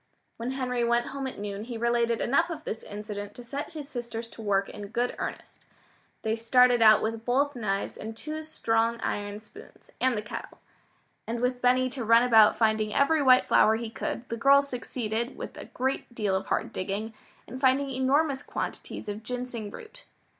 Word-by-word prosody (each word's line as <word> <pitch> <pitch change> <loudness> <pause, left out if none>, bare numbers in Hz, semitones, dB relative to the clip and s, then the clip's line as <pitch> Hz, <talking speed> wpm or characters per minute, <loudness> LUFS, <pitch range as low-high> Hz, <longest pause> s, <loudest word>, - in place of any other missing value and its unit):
When 240 +3 -3
Henry 250 -2 -1
went 235 0 +1
home 275 -1 -3
at 260 - -7
noon 205 +1 -5
he 235 -1 -5
related 235 0 +1
enough 330 +8 +2
of 320 -2 -6
this 220 - -4
incident 205 -1 -7
to 245 - -9
set 280 +7 -5
his 300 -3 -7
sisters 235 -4 -6
to - - -10
work 200 -2 +1
in 205 -1 -8
good 240 +4 -1
earnest. - - -6 0.6
They 220 0 +1
started 245 +1 +4
out 215 -1 +7
with 225 0 -2
both 275 +4 +1
knives 200 -4 -2
and 220 +1 -7
two 310 +4 -5
strong 230 -7 0
iron 205 0 -3
spoons, 410 - -16
and 255 -3 +2
the 210 - -3
kettle. 210 - -7 0.7
And 230 +1 -2
with 250 +1 0
Benny 255 +1 +4
to 255 -2 -4
run 230 +2 +6
about 220 -3 +6
finding 215 -1 +2
every 295 +5 +3
white 255 -2 +6
flower 220 - +5
he 225 0 -4
could, 235 +1 -4
the 230 - -3
girls 280 +3 +5
succeeded, 235 -1 -3
with - - -7
a - - -8
great 260 -1 -3
deal 205 -4 0
of 190 - -2
hard - - -1
digging, 205 +4 -3 0.3
in 255 +3 -8
finding 270 +1 +3
enormous 270 +2 +1
quantities 230 - -5
of 205 +1 -4
ginseng 245 -2 -5
root. 450 - -12
235 Hz, 190 wpm, -28 LUFS, 220-260 Hz, 0.7 s, out